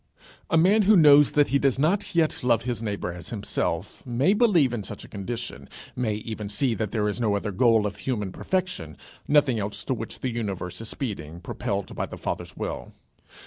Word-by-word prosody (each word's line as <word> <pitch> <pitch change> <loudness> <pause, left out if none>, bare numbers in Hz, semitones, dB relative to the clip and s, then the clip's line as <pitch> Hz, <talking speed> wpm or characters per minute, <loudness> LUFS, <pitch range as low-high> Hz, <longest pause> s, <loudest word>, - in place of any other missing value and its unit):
A - - +3
man 195 +7 +5
who 210 +2 +5
knows 145 -3 +7
that 145 -1 +4
he 140 - +3
does 135 -2 +2
not 170 +7 +1
yet 160 -5 +1
love 120 -3 +3
his 120 -2 -3
neighbour 100 -5 -3
as 85 -1 -9
himself 105 -3 -3
may 130 +10 +2
believe 190 - +4
in 115 - -2
such 100 +1 -8
a - - -13
condition, 100 - -6 0.3
may 115 -4 0
even 105 -1 -5
see 120 +4 +1
that 110 -1 -2
there 105 -2 0
is 105 +4 -2
no 105 -3 +2
other 105 +1 -2
goal 110 +1 +3
of 100 -2 -3
human 105 -7 -2
perfection, 180 - -3 0.3
nothing 145 -6 +4
else 100 0 -3
to 130 - -1
which 115 -2 -6
the 130 - -1
universe 100 -5 -4
is 115 - -4
speeding, 85 - -5
propelled 100 +2 -4
by - - -2
the - - -8
Father's - - -5
will. - - -5
115 Hz, 200 wpm, -25 LUFS, 105-140 Hz, 0.3 s, knows